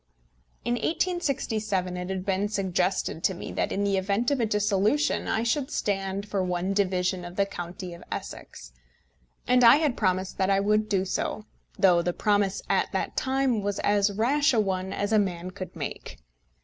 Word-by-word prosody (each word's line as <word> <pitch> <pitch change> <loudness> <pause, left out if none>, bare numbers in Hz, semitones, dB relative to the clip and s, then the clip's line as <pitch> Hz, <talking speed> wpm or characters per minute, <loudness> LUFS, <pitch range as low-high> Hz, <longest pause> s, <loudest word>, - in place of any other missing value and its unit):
In 240 - +1
1867 235 - -1
it 180 0 -5
had 190 -1 -3
been 200 +1 0
suggested 185 -4 -1
to 190 - +2
me - - -7
that, - - -1
in 200 - -1
the 200 -1 +1
event 200 +7 0
of 280 - +1
a 230 - +1
dissolution, 210 +7 +1
I 225 - 0
should 260 +4 0
stand 195 -5 -2
for 200 -2 -1
one 180 +1 -1
division 185 -2 0
of 175 0 -8
the 200 - +2
county 175 -1 -7
of 170 - -11
Essex; - - -7 0.8
and 250 0 +4
I 230 +2 +9
had 295 -4 +1
promised 185 -1 -1
that 190 0 +2
I 195 0 +3
would 210 +1 +1
do 195 -2 +1
so, 300 - -3 0.3
though 180 -3 +5
the 175 +1 -1
promise 205 -1 +1
at - - +1
that - - -2
time 265 -4 +1
was 200 0 -2
as 205 0 +2
rash 265 +7 +2
a - - +3
one 190 -2 -1
as 205 +2 -2
a 215 - +5
man 185 -2 -2
could 185 0 -8
make. - - -6
200 Hz, 185 wpm, -27 LUFS, 185-220 Hz, 0.8 s, I